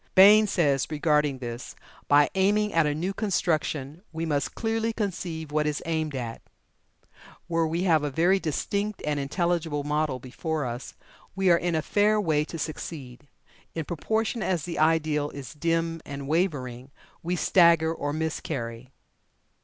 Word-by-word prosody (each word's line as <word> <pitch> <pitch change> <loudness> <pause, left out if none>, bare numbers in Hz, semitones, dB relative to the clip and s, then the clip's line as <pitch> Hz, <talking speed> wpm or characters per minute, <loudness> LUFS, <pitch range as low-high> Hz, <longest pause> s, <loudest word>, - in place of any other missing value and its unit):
Bain 210 +3 +8
says 145 -8 +1
regarding 150 -2 +1
this: 120 -1 -7 0.3
"By 145 0 +5
aiming 205 +2 +2
at 165 -2 +3
a 145 - 0
new 180 +5 -2
construction, 160 -7 -1
we 165 0 -3
must 145 -4 -1
clearly 225 0 -1
conceive 170 -7 -4
what 150 0 +1
is 150 -1 -1
aimed 160 -3 -1
at. 120 -3 -5 1.0
Where 165 -1 +1
we 170 +3 -1
have 165 -5 +4
a 145 - 0
very 175 +7 +3
distinct 200 +6 -2
and 150 -1 0
intelligible 160 0 -1
model 150 -2 0
before 145 +4 -4
us, 120 +1 -6 0.4
we 190 -2 +3
are - - +7
in 175 -1 -1
a 155 - 0
fair 210 +1 +3
way 155 -7 +2
to 165 - -7
succeed; 145 -4 -6 0.5
in 160 -2 -3
proportion 220 - -1
as 180 -7 0
the 170 +1 -4
ideal 155 -2 +2
is 135 -6 -8
dim 165 +1 -1
and 140 -1 -7
wavering, 135 -7 -1 0.3
we 175 +1 -1
stagger 170 -3 +4
or 145 -3 -3
miscarry." 130 -6 -4
160 Hz, 155 wpm, -26 LUFS, 145-175 Hz, 1.0 s, Bain